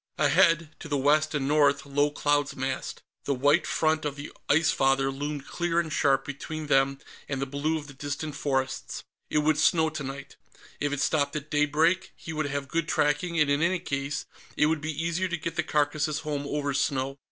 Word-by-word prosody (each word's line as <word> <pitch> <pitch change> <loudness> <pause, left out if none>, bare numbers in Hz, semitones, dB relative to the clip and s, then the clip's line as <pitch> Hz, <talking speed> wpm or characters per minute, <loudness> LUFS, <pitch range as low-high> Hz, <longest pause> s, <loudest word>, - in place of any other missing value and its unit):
Ahead, 165 +1 +3
to - - -8
the 145 -2 0
west 155 +3 +2
and 135 -2 0
north, 145 0 +3
low 145 +1 +2
clouds 145 -1 0
massed; 135 -1 -4 0.2
the 140 - 0
white 145 +3 +3
front 155 0 +1
of 145 -2 -2
the 145 +1 -8 0.2
Ice 160 +1 +4
Father 135 0 +2
loomed 145 +1 -4
clear 175 -1 -1
and 160 -2 -2
sharp 135 -1 +2
between 155 +2 -5
them 135 -1 +3 0.3
and 135 -2 -2
the 135 - -1
blue 145 +4 -1
of 150 - -7
the 145 - -11
distant 145 +2 -4
forests. 135 -2 -2 0.3
It - - 0
would 155 0 +2
snow, 160 0 +3
tonight. 140 -2 -7 0.4
If 145 0 -1
it 145 -1 -2
stopped 145 +1 +1
at 150 0 -5
daybreak, 155 +5 +2
he 160 - -8
would 155 -1 -1
have 140 0 -3
good 165 +3 -1
tracking, 160 +3 +1
and 150 - +4
in 140 +1 +1
any 180 +3 +2
case, 140 -3 -3 0.3
it 150 - +4
would 155 -1 +1
be 155 +1 -2
easier 170 +3 0
to 175 -1 -2
get 165 0 -5
the 175 - +2
carcasses 150 0 0
home 145 -2 -3
over 145 -1 -1
snow. 135 0 -1
145 Hz, 200 wpm, -27 LUFS, 140-155 Hz, 0.4 s, Ice